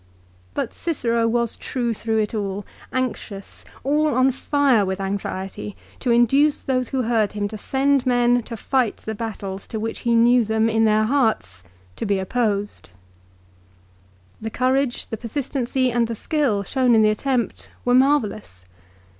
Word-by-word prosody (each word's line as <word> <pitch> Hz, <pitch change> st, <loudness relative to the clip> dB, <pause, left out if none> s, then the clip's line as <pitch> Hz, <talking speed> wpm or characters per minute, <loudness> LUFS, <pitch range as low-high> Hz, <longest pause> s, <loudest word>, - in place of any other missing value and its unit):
But -, -, -2 dB
Cicero 235 Hz, -8 st, 0 dB
was 235 Hz, 0 st, 0 dB
true 240 Hz, -3 st, -2 dB
through 220 Hz, +1 st, -2 dB
it 215 Hz, 0 st, 0 dB
all, 200 Hz, -2 st, -3 dB, 0.3 s
anxious, 230 Hz, -6 st, -4 dB, 0.2 s
all 300 Hz, +1 st, +2 dB
on 255 Hz, +1 st, +4 dB
fire 265 Hz, -3 st, +2 dB
with 190 Hz, 0 st, -2 dB
anxiety, 190 Hz, -, -4 dB, 0.2 s
to 250 Hz, -, -2 dB
induce 270 Hz, +5 st, +3 dB
those 255 Hz, -2 st, 0 dB
who 260 Hz, -2 st, 0 dB
heard 225 Hz, -3 st, +1 dB
him 205 Hz, -1 st, -1 dB
to 215 Hz, -, -7 dB
send 275 Hz, +2 st, +1 dB
men 245 Hz, 0 st, +3 dB
to 230 Hz, 0 st, -7 dB
fight 250 Hz, 0 st, 0 dB
the 220 Hz, -, -5 dB
battles 205 Hz, -3 st, -5 dB
to 220 Hz, -, -4 dB
which 225 Hz, +1 st, -3 dB
he 235 Hz, -1 st, +1 dB
knew 240 Hz, +1 st, +5 dB
them, 220 Hz, +1 st, +1 dB
in 225 Hz, 0 st, +3 dB
their 215 Hz, 0 st, +3 dB
hearts, 220 Hz, -, 0 dB, 0.4 s
to -, -, -3 dB
be 200 Hz, -1 st, +2 dB
opposed. 205 Hz, -, -2 dB, 1.5 s
The 220 Hz, -, -3 dB
courage, 255 Hz, +2 st, 0 dB
the 225 Hz, -, -5 dB
persistency, 255 Hz, +1 st, -1 dB
and 235 Hz, -1 st, +1 dB
the 230 Hz, -, -4 dB
skill, 260 Hz, -6 st, 0 dB
shown 250 Hz, +3 st, +2 dB
in 220 Hz, -, +5 dB
the 215 Hz, -, +5 dB
attempt 250 Hz, +2 st, -2 dB, 0.2 s
were 245 Hz, -, +3 dB
marvellous. 225 Hz, -, +1 dB
230 Hz, 155 wpm, -22 LUFS, 215-255 Hz, 1.5 s, knew